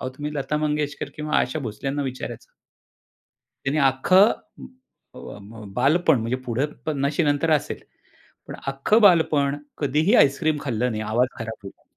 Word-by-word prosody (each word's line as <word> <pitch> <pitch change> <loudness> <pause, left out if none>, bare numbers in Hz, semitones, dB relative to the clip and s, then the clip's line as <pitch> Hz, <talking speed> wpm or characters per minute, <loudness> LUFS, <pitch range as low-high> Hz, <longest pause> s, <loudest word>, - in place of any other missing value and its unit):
अहो, 130 - -3
तुम्ही 150 +1 -5
लता 145 +1 -2
मंगेशकर 150 -1 -2
किंवा 150 0 -1
आशा 130 +5 -1
भोसल्यांना 135 +4 -4
विचारायचं. 130 -2 -6 1.2
त्यांनी 140 +3 0
अख्खं 185 - +4 0.8
अ, - - -11 0.2
ब 110 +2 -12
बालपण 140 +1 +3
म्हणजे 115 +3 -2
पुढे 125 +5 0 0.2
50शी 145 +2 0
नंतर 145 +2 +1
असेल. - - -6 0.7
पण - - -8
अख्खं 135 +11 +2
बालपण 155 -8 +4 0.2
कधीही 150 - +1
आईस्क्रीम 150 +2 +3
खाल्लं 125 -2 -1
नाही. 110 - -3
आवाज 110 +4 +1
खराब 110 0 -5
होईल. 95 - -12
140 Hz, 140 wpm, -23 LUFS, 125-150 Hz, 1.2 s, अख्खं